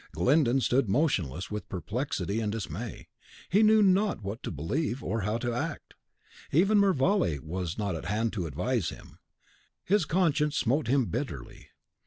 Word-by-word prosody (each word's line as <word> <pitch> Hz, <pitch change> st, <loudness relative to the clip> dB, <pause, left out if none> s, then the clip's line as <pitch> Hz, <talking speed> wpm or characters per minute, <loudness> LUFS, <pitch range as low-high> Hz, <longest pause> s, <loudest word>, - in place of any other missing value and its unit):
Glyndon 130 Hz, -, +3 dB
stood 125 Hz, -3 st, +2 dB
motionless 95 Hz, -, 0 dB
with 105 Hz, 0 st, -5 dB
perplexity 100 Hz, -, -2 dB
and 105 Hz, -2 st, -1 dB
dismay; 110 Hz, +1 st, -6 dB, 0.4 s
he 200 Hz, +4 st, +4 dB
knew 215 Hz, 0 st, +6 dB
not 195 Hz, -, +2 dB
what 100 Hz, +4 st, -5 dB
to -, -, -4 dB
believe, 120 Hz, -, -2 dB
or 110 Hz, +4 st, -1 dB
how 105 Hz, +3 st, -1 dB
to 120 Hz, 0 st, -2 dB
act. 120 Hz, -, -4 dB, 0.6 s
Even 195 Hz, +7 st, +4 dB
Mervale 190 Hz, -, +2 dB
was 85 Hz, +1 st, -4 dB
not 100 Hz, -3 st, -1 dB
at 80 Hz, -, -6 dB
hand 110 Hz, +5 st, -1 dB
to 90 Hz, -6 st, -2 dB
advise 95 Hz, -, -1 dB
him. -, -, -12 dB, 0.6 s
His 200 Hz, -3 st, +2 dB
conscience 155 Hz, -3 st, +1 dB
smote 130 Hz, +3 st, +1 dB
him 130 Hz, 0 st, +3 dB
bitterly. 85 Hz, -, -5 dB
120 Hz, 155 wpm, -28 LUFS, 95-155 Hz, 0.6 s, knew